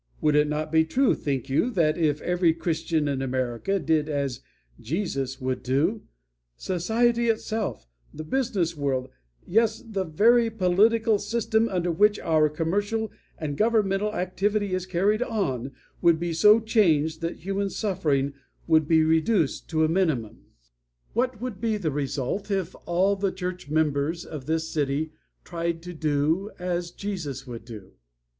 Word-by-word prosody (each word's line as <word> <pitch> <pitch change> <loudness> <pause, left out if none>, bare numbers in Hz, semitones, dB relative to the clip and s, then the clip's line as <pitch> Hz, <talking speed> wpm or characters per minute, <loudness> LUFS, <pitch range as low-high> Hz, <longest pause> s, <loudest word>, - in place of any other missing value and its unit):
Would 150 -1 +2
it 150 0 +4
not 150 +1 -2
be 160 0 +5
true, 250 +11 +2
think 135 -2 -3
you, 145 - +1
that 155 -5 +2
if 150 -3 0
every 175 -2 +2
Christian 160 -2 -1
in 140 -2 -1
America 130 +7 -1
did 155 -2 +1
as 140 -4 -2 0.4
Jesus 135 - -3
would 130 0 -2
do, 155 - 0 0.6
society 235 +6 +1
itself, 220 - -2 0.2
the 155 - -7
business 190 -4 -1
world, 135 -3 -1 0.4
yes, 220 +3 +2
the 205 -4 -3
very 225 +8 +4
political 220 +2 +3
system 225 0 0
under 180 -2 0
which 205 +5 +3
our 155 -2 +3
commercial 205 +8 -1 0.3
and 150 -3 -4
governmental 210 0 +1
activity 200 +2 -1
is 185 0 -2
carried 195 +5 +1
on, 160 - -1 0.3
would 170 -2 +4
be 170 0 -2
so 210 +7 +6
changed 165 -9 +2
that 165 0 -4
human 195 +2 -1
suffering 145 -10 0 0.3
would 160 -2 +3
be 160 -1 +4
reduced 160 +1 +1
to 160 -1 +2
a - - +2
minimum? 155 - -1 0.7
"What 245 0 0
would 235 -5 -5
be 225 -2 0
the 165 -7 -2
result 145 +7 -3
if 190 -3 -2
all 185 +4 +2
the 195 -1 -1
church 180 -4 -5
members 155 +1 0
of 150 -4 -8
this 160 0 0
city 150 0 -1 0.3
tried 170 -1 -3
to 180 0 -7
do 155 +5 0
as 175 -1 -2
Jesus 170 -9 -5
would 120 -3 -8
do? 105 -5 -10
170 Hz, 150 wpm, -26 LUFS, 150-205 Hz, 0.7 s, so